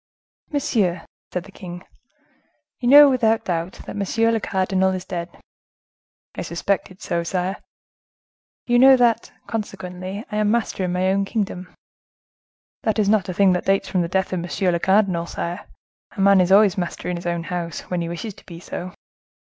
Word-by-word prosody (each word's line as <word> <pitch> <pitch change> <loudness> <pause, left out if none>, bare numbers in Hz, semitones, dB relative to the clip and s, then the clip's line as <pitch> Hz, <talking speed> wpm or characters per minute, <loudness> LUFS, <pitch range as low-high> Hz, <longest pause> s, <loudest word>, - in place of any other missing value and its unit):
"Monsieur," 205 - 0 0.3
said 180 - -3
the 200 - -14
king, 180 -2 -9 0.9
"you 240 - -2
know, 290 +2 +10
without 225 -4 +2
doubt, 170 0 -3
that - - -7
monsieur 225 +3 +1
le 225 - +1
cardinal 190 -1 +1
is 185 -1 -5
dead?" 175 -1 -6 0.9
"I - - -5
suspected 185 +2 -3
so, 170 - -1
sire." 180 +3 -2 1.1
"You 240 0 +3
know 265 +1 +8
that, 235 -2 +2
consequently, 190 -2 -5
I 210 - -2
am 210 -1 +2
master 220 -4 0
in 180 - -2
my 185 +1 +1
own 195 +1 +2
kingdom?" 195 -4 -3 1.1
"That 220 -1 0
is 205 -2 +2
not 205 -3 +2
a - - -2
thing 195 -1 +4
that 180 - -2
dates 195 0 +2
from 185 - +1
the 170 - -1
death 190 +1 -1
of 185 - -1
monsieur 180 +2 -1
le 170 - 0
cardinal, 190 -3 +2
sire; 175 +3 -5 0.4
a - - -13
man 195 -1 +6
is 180 +1 +1
always 200 -1 +5
master 175 - -4
in 180 - -1
his 175 0 -6
own 170 -1 -1
house, 170 -1 -4
when 180 -1 -3
he 170 - -3
wishes 185 +5 -5
to - - -19
be 170 -2 -9
so." 180 +1 -7
190 Hz, 180 wpm, -22 LUFS, 180-210 Hz, 1.1 s, know